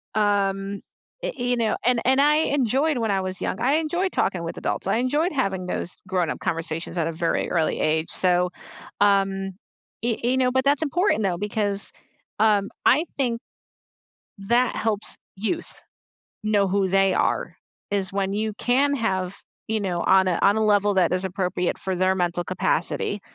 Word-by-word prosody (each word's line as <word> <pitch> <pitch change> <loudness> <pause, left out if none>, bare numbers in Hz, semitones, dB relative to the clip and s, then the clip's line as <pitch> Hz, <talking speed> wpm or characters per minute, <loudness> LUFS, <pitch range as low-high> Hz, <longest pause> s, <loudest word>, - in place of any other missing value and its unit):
Um, 200 -1 0 0.4
i - - -1
you 245 0 0
know? 225 -2 +1
And 245 -2 +3
and 265 +2 +4
I 300 +1 +5 0.2
enjoyed 265 +3 +1
when 225 -2 0
I 195 -1 +1
was 185 0 -5
young, - - -2
I 265 +4 +3
enjoyed 345 +4 0
talking 180 -3 0
with 165 - -5
adults. - - -3
I 195 - +2
enjoyed 295 +9 +1
having 195 -9 -1
those 180 - -4
grown 180 -4 0
up - - -4
conversations 165 +1 -3
at 165 -1 +1
a - - -1
very 165 +1 -1
early 165 -3 +1
age. 160 +1 +1
So, 180 -1 +2 0.5
um, 195 -1 +2 0.5
e 235 -2 0
e 255 +2 +2
know, 250 -1 +2
but 260 0 +1
that's 285 +2 +3
important 315 - +1
though, 180 -3 0
because, 205 0 -2 0.5
um, 205 -2 +3 0.2
I 305 +6 +5
think, 240 -4 0 1.0
that 240 +5 +1
helps 215 -1 -2 0.2
youth 225 - -2 0.7
know 210 -2 +2
who 195 0 +1
they 195 0 +3
are, - - 0 0.4
is 195 -2 -1
when 195 0 -1
you 215 +1 -1
can 270 +4 +2
have, 190 -6 -1 0.3
you 220 - +1
know, 180 -4 -1
on 190 0 +5
a 175 - +1
on 200 +2 +5
a 220 - +2
level 205 -1 +3
that 180 -2 +3
is 185 +1 0
appropriate 180 -1 -1
for 190 - -2
their 185 +1 +2
mental 175 -1 0
capacity, 185 +2 -1
200 Hz, 175 wpm, -24 LUFS, 185-245 Hz, 1.0 s, I